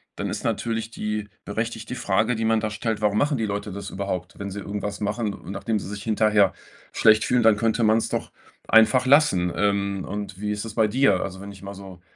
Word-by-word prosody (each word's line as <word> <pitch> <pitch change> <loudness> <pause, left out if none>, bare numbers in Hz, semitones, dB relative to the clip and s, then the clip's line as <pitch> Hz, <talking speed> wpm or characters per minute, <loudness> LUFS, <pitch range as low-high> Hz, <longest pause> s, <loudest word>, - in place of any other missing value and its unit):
Dann - - -3
ist - - -4
natürlich 115 -1 -2
die 105 -1 -3 0.2
berechtigte 115 +3 -4
Frage, 110 0 +1
die 110 0 -1
man 110 0 +3
da 110 - -2
stellt: 110 +1 -3
„Warum 105 0 +2
machen 145 +3 +2
die 110 - -1
Leute 100 0 -3
das 100 0 -6
überhaupt?" 95 -2 -4
Wenn 100 -1 -5
sie 100 - -5
irgendwas 100 +1 -4
machen 105 0 -1
und 95 - -9
nachdem 110 +1 -2
sie - - -7
sich 105 0 -6
hinterher 105 -3 +3 0.4
schlecht 110 0 +5
fühlen, 125 -1 +2
dann 110 -2 +5
könnte 115 +1 +1
man's 110 +1 +3
doch - - -3 0.4
einfach 120 +3 +5
lassen. 130 - +4
Ähm, 100 -1 0
und 100 -1 -5
wie 105 0 -2
ist 105 0 -3
das 110 - -7
bei 110 -2 +3
dir? 115 -4 +3
Also, 95 -1 -5
wenn 100 +1 -8
ich 95 - -15
mal 100 0 -7
so, 95 -2 -11
105 Hz, 220 wpm, -24 LUFS, 100-115 Hz, 0.4 s, schlecht